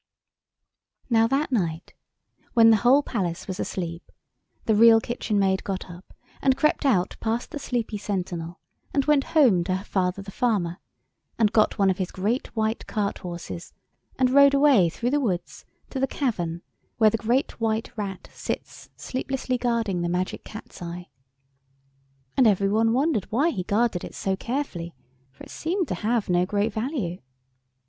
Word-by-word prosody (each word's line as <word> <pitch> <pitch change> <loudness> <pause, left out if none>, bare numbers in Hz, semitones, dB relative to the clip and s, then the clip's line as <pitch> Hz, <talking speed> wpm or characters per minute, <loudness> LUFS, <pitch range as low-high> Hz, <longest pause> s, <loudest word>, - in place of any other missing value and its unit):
Now 225 -1 +5
that 275 +4 0
night, 170 -8 -2 0.6
when 225 -1 +7
the 220 - +6
whole 255 +7 +4
palace 180 -10 -3
was 190 -1 -5
asleep, 170 -2 -5 0.5
the 220 - +3
Real 225 +1 +7
Kitchen 235 -2 -2
Maid 190 -1 +2
got 190 -2 -4
up 175 +2 -14 0.3
and 265 -1 +3
crept 295 0 +2
out 185 -8 +1
past 230 +2 -2
the 295 - -5
sleepy 235 -6 -3
sentinel 175 -4 -4 0.4
and 275 -2 +2
went 295 -2 +3
home 220 - +5
to 185 0 0
her 190 - -4
father 190 -1 -1
the 200 - -9
farmer 195 -8 0 0.6
and 215 -2 +3
got 215 -1 +3
one 195 -1 +4
of 185 - -4
his 185 - -1
great 215 +7 -1
white 220 0 -1
cart 205 -2 -2
horses 175 0 -7 0.4
and 255 -1 +3
rode 280 +1 +6
away 275 - +5
through 240 +9 -2
the 290 - +2
woods 185 -10 -3 0.3
to 265 - -3
the 270 - +2
cavern 175 - -2 0.3
where 220 -2 +5
the 225 - 0
Great 235 +5 0
White 220 +1 -1
Rat 200 -4 -5
sits - - -6
sleeplessly 260 -1 -3
guarding 230 -7 0
the 175 - -1
Magic 180 +1 -2
Cat's 220 - -11
eye. 175 +1 -7 1.3
And 260 -3 +5
every 195 -1 +3
one 225 +2 +3
wondered 265 - 0
why 285 +10 +2
he 185 - -3
guarded 205 0 0
it - - -8
so 190 -1 -1
carefully, 195 -8 -4 0.4
for 130 - -14
it - - -12
seemed 350 +1 -2
to - - 0
have 225 0 0
no 180 0 +3
great 205 +2 0
value. 220 - -3
215 Hz, 170 wpm, -25 LUFS, 185-250 Hz, 1.3 s, when